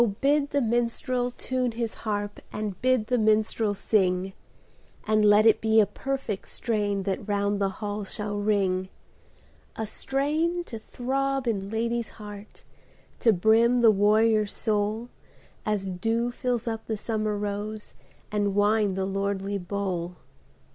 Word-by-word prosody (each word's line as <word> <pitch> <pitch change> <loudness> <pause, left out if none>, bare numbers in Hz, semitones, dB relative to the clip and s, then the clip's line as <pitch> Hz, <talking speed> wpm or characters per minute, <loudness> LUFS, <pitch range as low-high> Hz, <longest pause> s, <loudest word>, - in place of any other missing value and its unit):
BID 285 +1 +2
the 285 -2 +1
minstrel 240 +2 0
tune 250 -1 -2
his 230 -1 -3
haxp, 205 -2 -3
And 210 -3 -4
bid 255 -3 +2
the 245 +2 +1
minstrel 215 -1 +2
sing; 190 -2 +1 0.7
And 215 0 +3
let 210 +1 +6
it 220 -1 +5
be 220 0 +4
a 215 - +6
perfect 265 -5 -4
strain 205 -4 -1
That 195 +1 -3
round 205 0 0
the 195 - +2
hall 205 +1 -4
shall 205 +1 -4
ring: 190 -3 +1 0.9
A 220 - -3
strain 305 +10 -1
to 230 -9 -7
throb 270 +3 -2
in 200 -4 -1
lad/s 230 +1 -1
heart, 210 -1 -10 0.6
To 230 - +5
brim 225 +5 +4
the 230 -2 +7
warrior's 215 +1 +3
soul. 215 +2 -1 0.6
As 200 -3 0
dew 225 +6 0
fills 245 -1 -2
up 225 -1 -4
the 220 - -2
summer 215 -1 -1
rose 210 +1 -4 0.4
And 205 -2 0
wine 205 -1 +3
the 190 0 -1
lordly 195 0 -2
bowl 180 -2 -3
215 Hz, 140 wpm, -26 LUFS, 205-235 Hz, 0.9 s, the